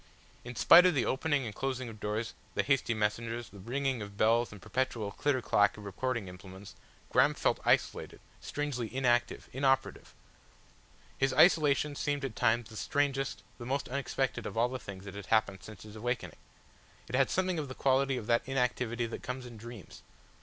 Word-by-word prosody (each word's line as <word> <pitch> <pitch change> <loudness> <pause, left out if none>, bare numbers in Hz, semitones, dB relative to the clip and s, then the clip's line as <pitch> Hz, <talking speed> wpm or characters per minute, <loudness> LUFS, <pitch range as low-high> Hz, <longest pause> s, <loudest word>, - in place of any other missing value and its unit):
In 120 0 -8
spite 180 +9 +8
of 180 - +2
the 130 - +2
opening 145 0 0
and 110 - -5
closing 130 +2 -3
of 110 -2 -9
doors, 105 +2 -3 0.2
the - - +2
hasty 135 -4 +1
messengers, 115 +2 -2
the 100 - -13
ringing 130 +4 -2
of 100 -1 -8
bells 115 +3 +3
and 105 - -10
the - - -19
perpetual 120 -5 -2
clitter 130 +2 0
clack 105 0 +3
of 105 - -10
recording 115 +2 -2
implements, 95 +1 -11 0.4
Graham - - +4
felt - - +1
isolated, - - +1 0.2
strangely 145 -5 -3
inactive, 120 -2 +1
inoperative. 135 0 0 1.0
His 135 -1 +2
isolation 150 -4 +4
seemed 145 -1 -1
at 120 -5 -5
times 115 +1 +2
the 110 - -10
strangest, 135 0 -1 0.2
the 120 - -7
most 140 0 -2
unexpected 135 0 -2
of - - -7
all 120 +2 +3
the 130 0 -5
things 100 -3 -9
that 95 - -8
had 100 -1 -8
happened 100 -4 +1
since 110 0 -11
his 105 0 -11
awakening. 120 +2 -3 0.7
It - - -10
had 135 +1 +3
something 185 -2 0
of 145 - -3
the 130 - -8
quality 135 0 +2
of 110 - -5
that 115 +1 +3
inactivity 125 -3 0
that 115 - -6
comes 125 0 -5
in 120 -1 -10
dreams. 115 -2 -11
120 Hz, 185 wpm, -31 LUFS, 110-135 Hz, 1.0 s, spite